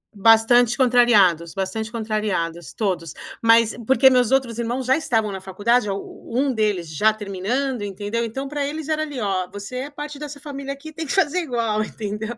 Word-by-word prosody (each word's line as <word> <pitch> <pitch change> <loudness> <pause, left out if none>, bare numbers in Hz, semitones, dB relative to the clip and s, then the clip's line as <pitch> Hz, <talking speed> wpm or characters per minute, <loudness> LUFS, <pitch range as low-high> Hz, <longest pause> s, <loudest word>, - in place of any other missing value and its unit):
Bastante 225 +3 +5
contrariados, 215 - +4
bastante 195 +4 -3
contrariados, 210 - -3
todos. 180 -7 -2 0.3
Mas 230 -1 +4
porque 265 +2 +6
meus 250 -2 +3
outros 260 -4 +1
irmãos 240 +2 -2
já 265 +3 +4
estavam 225 -9 0
na 190 - -5
faculdade, 210 +5 +1
a 200 - -1
um 255 +7 -3
deles 210 -8 -1
já 215 +8 +3
terminando, 215 +5 -2
entendeu? 205 +4 -3
Então 265 +5 -5
para 290 0 -2
eles 305 +1 -5
era 310 0 0
ali 290 -4 -5
"Ó, 190 -4 -1
você 205 +5 -8
é 265 +3 -4
parte 295 0 -7
dessa 290 -1 -8
família 275 -1 -6
aqui, 280 +3 -11
tem 320 +1 -6
que 280 - -3
fazer 360 -2 +2
igual", 230 -8 -1
entendeu? 215 +2 -5
230 Hz, 180 wpm, -22 LUFS, 205-270 Hz, 0.3 s, porque